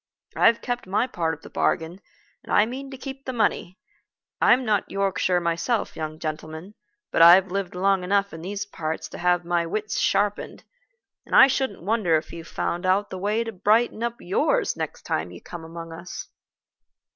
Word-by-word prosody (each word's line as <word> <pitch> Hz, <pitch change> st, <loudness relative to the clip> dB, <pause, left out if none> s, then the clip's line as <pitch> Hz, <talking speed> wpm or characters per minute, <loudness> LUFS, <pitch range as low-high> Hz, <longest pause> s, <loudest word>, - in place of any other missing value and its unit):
I've 230 Hz, 0 st, +4 dB
kept 245 Hz, -4 st, -3 dB
my 205 Hz, +5 st, +1 dB
part 165 Hz, -10 st, -2 dB
of 150 Hz, -, -22 dB
the -, -, -11 dB
bargain, 170 Hz, +3 st, -1 dB, 0.4 s
and -, -, -10 dB
I 210 Hz, -, +5 dB
mean 265 Hz, +4 st, -6 dB
to 265 Hz, -, -8 dB
keep 270 Hz, +1 st, -8 dB
the 260 Hz, -, -3 dB
money. 210 Hz, -5 st, 0 dB, 0.6 s
I'm 255 Hz, +1 st, +5 dB
not 210 Hz, -3 st, +1 dB
Yorkshire 195 Hz, -2 st, +1 dB
myself, 170 Hz, +7 st, -1 dB
young 155 Hz, 0 st, -5 dB
gentleman, 155 Hz, +4 st, -6 dB, 0.4 s
but -, -, +2 dB
I've 180 Hz, +3 st, +8 dB
lived 195 Hz, -2 st, -3 dB
long 190 Hz, 0 st, +2 dB
enough 200 Hz, +2 st, +1 dB
in 160 Hz, -, -8 dB
these 200 Hz, +3 st, -4 dB
parts 160 Hz, -5 st, -4 dB
to -, -, -9 dB
have 175 Hz, 0 st, +2 dB
my 170 Hz, -1 st, 0 dB
wits 215 Hz, +4 st, -2 dB
sharpened, 205 Hz, 0 st, 0 dB, 0.6 s
and -, -, -3 dB
I -, -, +10 dB
shouldn't 265 Hz, -8 st, -1 dB
wonder 200 Hz, -5 st, +2 dB
if 155 Hz, -, -7 dB
you 165 Hz, -1 st, -7 dB
found 170 Hz, +2 st, -3 dB
out 190 Hz, +2 st, +1 dB
the 185 Hz, -, -5 dB
way 210 Hz, +4 st, 0 dB
to 230 Hz, -, -5 dB
brighten 215 Hz, +4 st, +2 dB
up 235 Hz, 0 st, -1 dB
yours 180 Hz, -, +1 dB
next -, -, -5 dB
time 80 Hz, +3 st, -2 dB
you 90 Hz, -1 st, -11 dB
come 175 Hz, -2 st, -9 dB
among 165 Hz, 0 st, -8 dB
us." 170 Hz, +2 st, -8 dB
190 Hz, 185 wpm, -24 LUFS, 170-215 Hz, 0.6 s, I